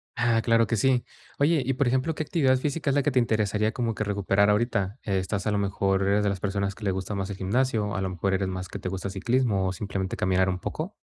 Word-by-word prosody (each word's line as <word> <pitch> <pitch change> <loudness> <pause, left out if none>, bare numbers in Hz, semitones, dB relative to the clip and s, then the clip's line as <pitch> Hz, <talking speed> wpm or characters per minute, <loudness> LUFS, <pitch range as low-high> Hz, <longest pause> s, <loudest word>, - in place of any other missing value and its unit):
Ah, 115 -2 +2
claro 115 0 +3
que 115 - -1
sí. 125 +2 +2 0.3
Oye, 150 +1 +3
y, 135 - +1
por 130 0 +1
ejemplo, 130 +5 +1
¿qué 155 - -2
actividad 135 -5 +2
física 145 +2 -2
es 140 - +1
la 140 - +2
que 150 - +1
te 130 - +3
interesaría 110 -2 +1
como 120 -3 -2
que 110 - -2
recuperar 100 0 +2
ahorita? 105 -1 0
¿Estás 100 0 -1
a 105 - +1
lo 105 - +1
mejor 95 -1 0
eres 100 +1 +2
de 100 - +2
las 100 - -2
personas 100 0 -1
que 110 - -13
le 100 - +1
gusta 95 +2 -4
más 95 0 -3
el 95 - -5
gimnasio 110 +2 0
o 100 - -4
a 95 - -1
lo 95 - -1
mejor, 95 +2 -1
eres 95 0 0
más 95 0 -4
que - - -7
te 90 - -4
gusta 95 +1 -4
ciclismo 105 -1 +1
o 95 - -1
simplemente 95 -1 -4
caminar 95 0 +2
un 90 0 -2
poco? 170 - -5
105 Hz, 265 wpm, -26 LUFS, 95-125 Hz, 0.3 s, claro